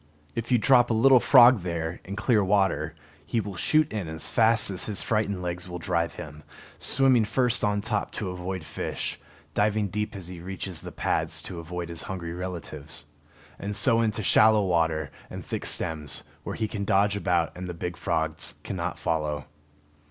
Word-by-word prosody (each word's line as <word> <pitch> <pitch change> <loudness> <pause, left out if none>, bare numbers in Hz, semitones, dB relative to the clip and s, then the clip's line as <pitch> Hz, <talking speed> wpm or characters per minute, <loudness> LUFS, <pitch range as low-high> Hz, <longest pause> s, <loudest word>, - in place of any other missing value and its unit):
If 115 +2 -4
you 125 - +6
drop 120 +1 +5
a 115 - +2
little 130 +3 +6
frog 125 -2 +7
there, 85 -2 -4
in 100 - -5
clear 110 0 +2
water, 95 -5 +1 0.3
he 115 +10 -1
will 100 -2 -4
shoot 155 - +2
in 100 -6 -3
as 80 0 -6
fast 115 -3 +3
as 95 - 0
his 105 -3 -3
frightened 100 -4 0
legs 90 0 -4
will 90 - -5
drive 85 -1 -1
him, 75 0 -9 0.4
swimming 130 -4 +3
first 120 +2 +1
on 105 -1 +1
top 105 0 -2
to 95 -4 -3
avoid 90 0 -5
fish, - - -4 0.3
diving 105 +1 +1
deep 105 +2 -3
as 95 -3 -7
he 90 -1 -8
reaches 95 -1 -5
the - - -8
pads - - -1
to 85 - -6
avoid 85 +1 -5
his 85 -1 -5
hungry 85 -3 -5
relatives; 85 -5 -6 0.5
and 100 +1 -4
so 115 +3 +4
in 115 - +3
to 110 - -4
shallow 110 +1 +5
water 80 -4 +1 0.2
and - - -8
thick - - -3
stems, 80 -5 -1 0.2
where - - -5
he 110 - -1
can 105 -1 -4
dodge 100 +1 +3
about 90 -4 +1
and 90 0 -6
the - - -4
big 90 +1 -4
frogs 80 -1 -1
cannot - - -3
follow. 75 -3 -1
95 Hz, 185 wpm, -27 LUFS, 85-110 Hz, 0.5 s, frog